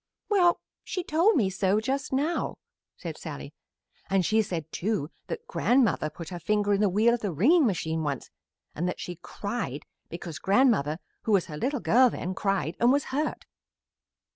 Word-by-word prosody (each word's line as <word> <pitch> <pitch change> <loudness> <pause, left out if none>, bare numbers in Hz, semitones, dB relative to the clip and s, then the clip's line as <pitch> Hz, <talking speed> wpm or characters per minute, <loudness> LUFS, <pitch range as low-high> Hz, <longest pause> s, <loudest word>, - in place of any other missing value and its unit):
"Well, 360 -5 +4 0.2
she 365 - -3
told 340 +8 +3
me 200 -7 +2
so 195 +2 +2
just 265 +5 -2
now," 290 +6 -1 0.4
said - - -7
Sallie, - - -7 0.6
"and 190 -2 +2
she 220 +4 +3
said, 165 -6 -4
too, 190 -5 -2 0.2
that 465 - -5
grandmother 245 - +2
put 165 +1 -9
her 175 -2 -6
finger 205 +3 +1
in 200 - +2
the 205 - +4
wheel 215 +5 +3
of 240 - 0
the 205 -4 -2
wringing 270 - +4
machine 160 -5 -1
once, 145 -4 -3 0.4
and 175 +3 -2
that 180 - -3
she 175 -1 -6
cried 180 - -4 0.3
because 170 -2 -7
grandmother, 195 - +3 0.3
who 220 - +2
was 190 -3 +4
her 150 - -7
little 265 - -1
girl 255 +2 +5
then, 185 -4 -4
cried, 190 -4 -1
and 240 +1 +5
was 285 +1 +2
hurt." 300 +2 -1
205 Hz, 175 wpm, -27 LUFS, 175-260 Hz, 0.6 s, girl